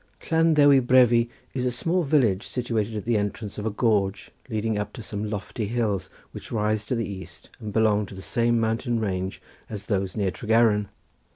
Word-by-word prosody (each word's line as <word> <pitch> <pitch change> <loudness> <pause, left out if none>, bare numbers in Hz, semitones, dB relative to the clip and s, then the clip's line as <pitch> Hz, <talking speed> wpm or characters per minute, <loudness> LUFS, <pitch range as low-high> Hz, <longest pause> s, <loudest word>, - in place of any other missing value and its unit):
Llan 165 0 +4
Ddewi 145 -2 +6
Brefi 120 -2 +4 0.2
is 125 - -2
a 125 - +2
small 170 +9 +1
village 125 - +2
situated 115 -3 -2
at 105 - -5
the 115 -1 +2
entrance 105 +1 -4
of 105 - -3
a - - +2
gorge 100 -4 0 0.2
leading 110 -1 -1
up 105 - -4
to 115 - -8
some 105 0 -4
lofty 105 +1 -4
hills 110 -4 -1 0.2
which - - -10
rise 105 -1 0
to 125 - 0
the 115 -1 -2
east 85 -4 -9
and 110 -3 -6
belong 105 -1 +2
to 95 - -10
the 95 - -8
same 120 0 +1
mountain 115 +2 0
range 95 -3 -3 0.3
as 100 -2 -6
those 95 -2 -1
near 100 -3 +1
Tregaron. 110 0 +2
110 Hz, 190 wpm, -25 LUFS, 100-120 Hz, 0.3 s, Ddewi